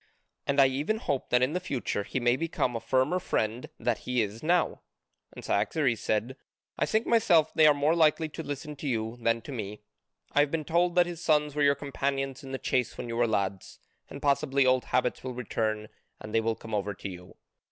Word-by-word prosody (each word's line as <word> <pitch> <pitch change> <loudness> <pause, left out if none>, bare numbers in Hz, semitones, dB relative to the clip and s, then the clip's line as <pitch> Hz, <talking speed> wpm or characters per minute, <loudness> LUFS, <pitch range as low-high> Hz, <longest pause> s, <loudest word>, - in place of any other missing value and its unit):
And 140 0 +2
I 135 - +8
even 145 +11 0
hope 140 - -2
that 125 0 +3
in 130 +4 +1
the 180 - 0
future 135 - -2
he 115 - -3
may 120 0 +3
become 145 -5 -1
a - - -1
firmer 130 +9 +1
friend 115 -7 -2
that 120 -2 0
he 125 -1 -2
is 105 +2 -6
now." 170 +1 +1 0.5
And - - -10
Cyaxares 130 -8 +1
said: 110 +6 -1 0.4
"I - - 0
think 220 +1 +1
myself 175 -9 +4
they 155 -1 +6
are 150 - +7
more 145 +3 +2
likely 160 -1 +3
to 155 +2 -7
listen 150 0 -6
to 145 - -5
you 115 -2 -2
than 115 0 +1
to - - -8
me. 105 -4 -6 0.5
I - - +2
have 145 0 +4
been 155 0 -2
told 175 +2 +2
that 175 -1 +5
his 175 -1 -7
sons 150 -2 +2
were 150 - -1
your 140 0 +5
companions 135 0 -3
in 135 - -8
the 135 - -2
chase 125 -2 -1
when 120 - -5
you 115 - -3
were 120 0 +2
lads, 100 -3 -2 0.3
and 140 - -9
possibly 140 -1 +2
old 130 0 +3
habits 125 -1 0
will 130 -1 -5
return 110 -3 -2 0.3
and 105 - -9
they 115 - +3
will 115 0 0
come 110 0 -10
over 105 -1 -1
to 100 - -6
you. 90 -1 -10
135 Hz, 220 wpm, -28 LUFS, 115-150 Hz, 0.5 s, I